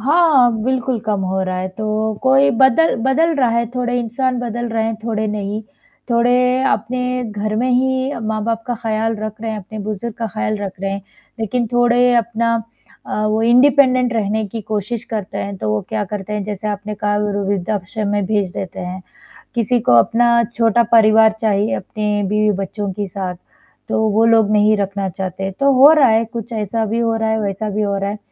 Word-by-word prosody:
हाँ, 280 Hz, -3 st, +4 dB
बिल्कुल 260 Hz, -2 st, 0 dB
कम 210 Hz, -2 st, 0 dB
हो 190 Hz, +1 st, -1 dB
रहा 185 Hz, 0 st, -3 dB
है, 185 Hz, +1 st, -3 dB
तो 215 Hz, +2 st, -2 dB
कोई 135 Hz, +2 st, +4 dB
बदल 265 Hz, +5 st, +4 dB
बदल 320 Hz, +6 st, +2 dB
रहा 255 Hz, -3 st, +3 dB
है 235 Hz, 0 st, +1 dB
थोड़े 245 Hz, 0 st, -1 dB
इंसान 250 Hz, +2 st, -1 dB
बदल 240 Hz, 0 st, -3 dB
रहे 225 Hz, -1 st, -1 dB
हैं, 225 Hz, 0 st, -1 dB
थोड़े 220 Hz, -2 st, -1 dB
नहीं। 210 Hz, +1 st, -3 dB, 0.5 s
थोड़े 235 Hz, +1 st, +3 dB, 0.4 s
अपने 250 Hz, 0 st, -1 dB
घर 210 Hz, +1 st, -3 dB
में 250 Hz, +3 st, 0 dB
ही 260 Hz, +1 st, +1 dB
अ, 240 Hz, -, -5 dB
माँ-बाप 220 Hz, +1 st, -2 dB
का 245 Hz, -, -1 dB
ख़्याल 225 Hz, 0 st, -1 dB
रख 215 Hz, +1 st, -6 dB
रहे 225 Hz, -1 st, -3 dB
हैं, 215 Hz, -, -4 dB
अपने 215 Hz, +3 st, -9 dB
बुज़ुर्ग 215 Hz, +2 st, -5 dB
का 225 Hz, -, -2 dB
ख़्याल 215 Hz, 0 st, -2 dB
रख 195 Hz, -2 st, -6 dB
रहे 195 Hz, 0 st, -2 dB
हैं, 200 Hz, 0 st, -5 dB, 0.4 s
लेकिन 235 Hz, +2 st, -1 dB
थोड़े 245 Hz, +1 st, +3 dB
अपना 230 Hz, 0 st, +1 dB, 0.5 s
अ, -, -, -4 dB
वो 215 Hz, +1 st, +1 dB
इंडिपेंडेंट 255 Hz, +1 st, +4 dB
रहने 220 Hz, -1 st, -1 dB
की 225 Hz, +3 st, -5 dB
कोशिश 215 Hz, +3 st, -3 dB
करते 210 Hz, -4 st, -4 dB
हैं, 200 Hz, 0 st, -4 dB
तो 110 Hz, -, -3 dB
वो 105 Hz, 0 st, 0 dB
क्या 205 Hz, -, -2 dB
करते 210 Hz, 0 st, -5 dB
हैं 210 Hz, -, -2 dB
जैसे 210 Hz, 0 st, -4 dB
आपने 210 Hz, +1 st, -4 dB
कहा 205 Hz, 0 st, -1 dB
वे 210 Hz, 0 st, -1 dB
व 200 Hz, -, -2 dB
वृद्धाश्रम 205 Hz, +2 st, -2 dB
में 205 Hz, -1 st, 0 dB
भेज 200 Hz, -3 st, 0 dB
देते 185 Hz, -2 st, -6 dB
हैं। 180 Hz, +1 st, -6 dB, 0.5 s
किसी 240 Hz, +1 st, +1 dB
को -, -, +6 dB
अपना 235 Hz, -, +3 dB
छोटा 230 Hz, 0 st, +3 dB
परिवार 220 Hz, -1 st, +5 dB
चाहिए, 210 Hz, -1 st, +1 dB
अपने 210 Hz, +1 st, -2 dB
बीवी-बच्चों 205 Hz, -1 st, -1 dB
के 205 Hz, 0 st, -4 dB
साथ, 185 Hz, -1 st, -5 dB, 0.5 s
तो -, -, 0 dB
वो 220 Hz, +2 st, +3 dB
लोग 225 Hz, -2 st, +4 dB
नहीं 215 Hz, 0 st, +4 dB
रखना 200 Hz, -1 st, -2 dB
चाहते, 190 Hz, +1 st, -4 dB
तो 275 Hz, +8 st, +2 dB
हो 270 Hz, +4 st, +8 dB
रहा 285 Hz, -5 st, +5 dB
है 220 Hz, +1 st, +3 dB
कुछ 230 Hz, +1 st, -7 dB
ऐसा 220 Hz, +1 st, -2 dB
भी 225 Hz, +3 st, -2 dB
हो 230 Hz, -1 st, +1 dB
रहा 225 Hz, 0 st, -1 dB
है, 220 Hz, 0 st, 0 dB
वैसा 205 Hz, +1 st, -3 dB
भी 210 Hz, +1 st, -2 dB
हो 200 Hz, -1 st, 0 dB
रहा 195 Hz, 0 st, -2 dB
है, 205 Hz, -, -4 dB
220 Hz, 200 wpm, -18 LUFS, 205-235 Hz, 0.5 s, हो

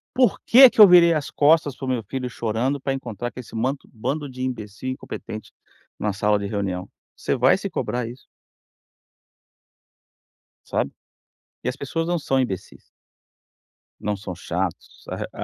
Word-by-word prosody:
por 250 Hz, -5 st, +3 dB
que 260 Hz, +3 st, +9 dB
que 220 Hz, -, +4 dB
eu 205 Hz, -, +12 dB
virei 175 Hz, -1 st, +7 dB
as 150 Hz, -3 st, -2 dB
costas 150 Hz, -2 st, +3 dB
para 135 Hz, -, -6 dB
o -, -, -3 dB
meu 125 Hz, -3 st, -1 dB
filho 130 Hz, +2 st, -4 dB
chorando 120 Hz, +4 st, -1 dB
pra 135 Hz, -, -1 dB
encontrar 120 Hz, -3 st, -5 dB
com -, -, -10 dB
esse 120 Hz, -2 st, -10 dB
manto 130 Hz, +5 st, -2 dB
bando 145 Hz, +6 st, -3 dB
de 130 Hz, 0 st, -9 dB
imbecil 120 Hz, -2 st, -4 dB
incompetente 110 Hz, -4 st, -7 dB, 0.5 s
numa 105 Hz, -1 st, -1 dB
sala 105 Hz, +1 st, +1 dB
de 100 Hz, -, -3 dB
reunião?". 95 Hz, -2 st, -3 dB, 0.3 s
Você -, -, -1 dB
vai 130 Hz, +2 st, +4 dB
se 200 Hz, 0 st, -4 dB
cobrar 125 Hz, -7 st, -2 dB
isso. 125 Hz, +2 st, -13 dB, 2.4 s
Sabe? 70 Hz, -, -1 dB, 0.7 s
E -, -, 0 dB
as 125 Hz, -, -4 dB
pessoas 165 Hz, +4 st, -3 dB
não 175 Hz, -, +1 dB
são 135 Hz, -2 st, 0 dB
imbecis. 95 Hz, -8 st, -4 dB, 1.2 s
Não 105 Hz, 0 st, -1 dB
são 95 Hz, -2 st, -7 dB
chatos, 90 Hz, 0 st, -4 dB, 0.3 s
a -, -, -5 dB
125 Hz, 160 wpm, -23 LUFS, 105-145 Hz, 2.4 s, eu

